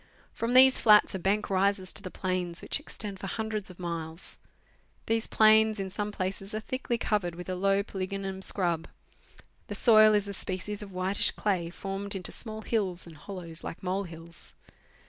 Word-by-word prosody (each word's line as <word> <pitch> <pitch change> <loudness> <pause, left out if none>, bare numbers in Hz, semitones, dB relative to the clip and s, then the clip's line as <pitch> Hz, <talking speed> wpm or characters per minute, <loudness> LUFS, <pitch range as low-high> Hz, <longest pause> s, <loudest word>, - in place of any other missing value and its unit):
From 235 +2 -1
these 260 0 +7
flats 210 -1 +6
a 190 - -3
bank 200 +4 +1
rises 195 -1 +1
to - - -3
the 185 - -6
plains, 185 -2 -2
which - - 0
extend 210 -9 -5
for 195 - -5
hundreds 215 -1 -3
of 180 - -12
miles. 165 -1 -5 0.7
These 225 0 0
plains, 220 0 +5
in 190 -1 -4
some 205 +2 -3
places, 195 +1 -4
are - - -1
thickly 245 +1 -3
covered 200 -6 -1
with 180 +1 -8
a 185 - -2
low 195 +2 +2
polygonum 195 -1 -4
scrub; 175 -4 -1 0.8
the - - -5
soil 215 -2 +6
is 205 -1 +1
a 200 - -4
species 200 +2 -3
of 205 -2 -8
whitish 185 +2 +1
clay, 185 -5 -1
formed 195 +2 -4
into 185 -3 +1
small 220 -2 -4
hills 190 -6 -1
and 165 -2 -12
hollows 170 0 -6
like 165 - -7
mole 190 +2 -1
hills. 165 -1 -12
195 Hz, 180 wpm, -29 LUFS, 185-210 Hz, 0.8 s, these